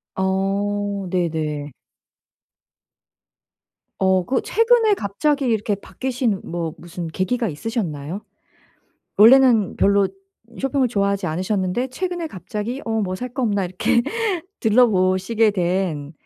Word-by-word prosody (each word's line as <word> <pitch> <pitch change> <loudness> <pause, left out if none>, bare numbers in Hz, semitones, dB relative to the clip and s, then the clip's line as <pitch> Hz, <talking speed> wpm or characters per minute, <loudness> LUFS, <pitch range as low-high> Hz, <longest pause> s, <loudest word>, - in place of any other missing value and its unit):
어 195 +1 -1
네네. 155 -5 -2 2.3
어 190 -1 +3
그 255 +5 0
최근에 455 -1 +3
갑자기 285 - 0
이렇게 215 -3 0
바뀌신 240 0 -2
뭐 165 -2 -4
무슨 175 0 -7
계기가 210 +8 -1
있으셨나요? 170 - -4 1.0
원래는 230 -2 +6
별로 200 0 +3 0.5
쇼핑을 270 -1 +1
좋아하지 200 -4 0
않으셨는데 185 +7 -1
최근에 350 +4 -3
갑자기 210 - -5
'어 225 - -2
뭐 185 -2 -2
살 250 +4 -6
거 260 - -3
없나?' 205 -4 +1
이렇게 180 +6 +1 0.6
들러 240 +3 +5
보시게 190 +3 +2
된 175 -6 -1
200 Hz, 245 characters per minute, -21 LUFS, 185-245 Hz, 2.3 s, 원래는